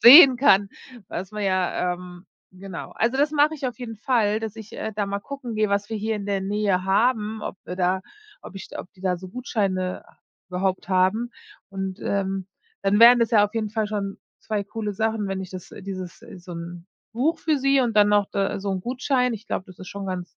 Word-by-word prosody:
sehen 265 +1 +11
kann, 200 -6 +5 0.4
was 185 +3 -5
man 210 -1 -3
ja, 185 -1 +1
ähm 180 0 -11 0.2
genau. 185 -1 -8
Also, 235 +3 +1
das 290 +2 +3
mache 300 +1 +3
ich 285 - -8
auf 245 - -9
jeden 240 -3 -6
Fall, 220 -2 +1
dass 220 -1 -5
ich, 220 -1 -10
äh, 220 - -4
da 205 -1 -1
mal 200 0 -3
gucken 265 -1 -6
gehe, 215 -1 +2
was 200 +1 0
wir 225 - -3
hier 215 +1 -1
in 200 -1 -6
der 200 -1 0
Nähe 195 -1 0
haben, 215 +2 +1
ob - - -5
da 180 +1 0 0.4
ob 195 - -10
ich - - -8
ob - - -8
die 190 - -21
da 185 -1 +1
so 185 +2 -9
Gutscheine 190 -5 -2 0.4
überhaupt 185 0 -1
haben. 190 +6 +2 0.4
Und, 195 0 -5
ähm, 195 -1 -1 0.4
dann 200 +1 +3
wären 240 +2 +9
das 230 +1 +2
ja 210 -3 +6
auf 210 - -5
jeden 220 -2 -1
Fall 215 0 0
schon 200 -2 -3 0.2
2 210 -2 -2
coole 210 0 -4
Sachen, 220 0 0
wenn 195 0 -2
ich 190 -1 -7
das 185 -1 -8
dieses 185 -2 -6 0.2
so 175 0 -10
'n 170 +1 -7 0.3
Buch 300 +8 +1
für 315 -1 +1
sie 275 0 +3
und 235 -3 0
dann 205 0 +6
noch 205 -1 +4
äh, 195 0 0
so 200 0 -3
'n 185 - -2
Gutschein. 250 +2 0
Ich 220 -1 -7
glaub, 185 - -2
das 185 -2 -15
ist 185 - -9
schon 200 -1 -6
ganz 185 -1 -3
205 Hz, 220 wpm, -24 LUFS, 190-225 Hz, 0.4 s, sehen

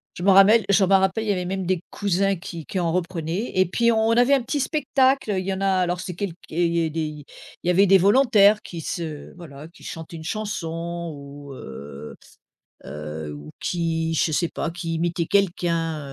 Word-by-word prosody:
Je 175 - -6
m'en 195 0 +5
rappelle 205 +4 +6
je 200 0 +4
m'en 195 +1 +5
rappelle, 190 +3 0
il - - -2
y - - +4
avait 180 -2 -1
même 190 +1 -3
des 180 -1 0
cousins 195 0 +1
qui 170 -3 -8
qui 190 - -3
en 170 -2 0
reprenaient, 175 +3 -2
et 185 - +5
puis 235 +6 +2
on 220 -1 +2
on - - +3
avait 245 +3 +5
un 275 - +4
petit 260 +5 -2
spectacle. 270 -4 +1
Il 185 - -2
y 195 - -1
en 190 - -5
a 195 - +1
alors 180 0 -1
c'est 180 -2 -6
quelque 185 -2 -4
et 175 +2 +1
il 170 - 0
y 165 -1 +2
a - - -4
des 160 +1 -3
il 150 -1 -4
y 145 - -13 0.4
il - - -5
y - - +4
avait 185 +3 +5
des 195 0 +6
volontaires 210 0 +5
qui 170 -2 -8
se 160 -4 -5
voilà, 155 -4 -11
qui 170 - -19
chantaient 165 0 -8
une 160 - -9
chanson 170 -4 -4
ou, 140 0 -10
heu 70 - -9 0.7
heu, 75 +1 -6
ou 75 +1 -10
qui 165 -2 -1
je 160 - +1
sais 170 +3 +1
pas 165 - -3
qui 165 -1 -4
imitaient 170 0 -1
quelqu'un 170 -4 0
175 Hz, 225 wpm, -23 LUFS, 165-195 Hz, 0.7 s, rappelle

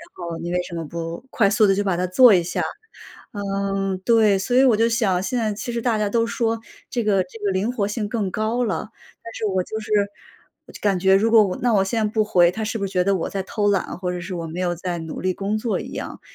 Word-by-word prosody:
后 170 -2 -6
你 175 +1 -4
为 180 - +1
什 175 - -10
么 165 - -3
不 170 - -6
快 220 - +2
速 215 +1 +4
地 195 - +3
就 205 - 0
把 190 -3 0
它 180 +1 -1
做 235 +5 +7
一 180 - +4
下？ 170 - -2 0.7
嗯， 195 -1 -2
对， 220 -4 +4
所 245 +6 -1
以 260 - +7
我 245 -5 +5
就 230 +1 +3
想 215 -6 +1
现 225 +6 -2
在 220 -3 0
其 220 +4 -5
实 235 -1 -3
大 230 -3 +1
家 210 - 0
都 230 +2 +1
说 225 -1 -1 0.3
这 240 - -1
个 200 -3 +2
这 195 +5 -14
个 200 - +2
灵 195 +5 0
活 205 -5 -1
性 210 0 -3
更 210 -4 -2
高 220 +5 -1
了， 205 -3 -2 0.4
但 230 - -9
是 - - -4
我 190 -2 0
就 220 +3 -5
是 215 - -9 0.8
我 - - -14
就 - - -10
感 200 -3 +2
觉 190 +1 +5
如 215 +4 +2
果 220 -2 +7
我 185 -2 -2
那 240 -2 +2
我 195 - +4
现 220 +3 0
在 - - +1
不 220 - +2
回， 175 -4 +4
他 220 +3 -5
是 225 +1 -2
不 200 - -1
是 195 - -8
觉 180 - +2
得 195 +1 +2
我 165 - -2
在 195 -1 -3
偷 205 +2 -2
懒， 195 -3 -1
或 180 -1 -2
者 180 - -4
是 180 +2 -7
我 165 -1 -4
没 170 +3 -6
有 175 -1 -1
在 175 0 -4
努 160 -1 -6
力 185 0 0
工 200 +2 -2
作 225 0 -1
一 - - -7
样。 - - -6
200 Hz, 295 characters per minute, -22 LUFS, 185-220 Hz, 0.8 s, 做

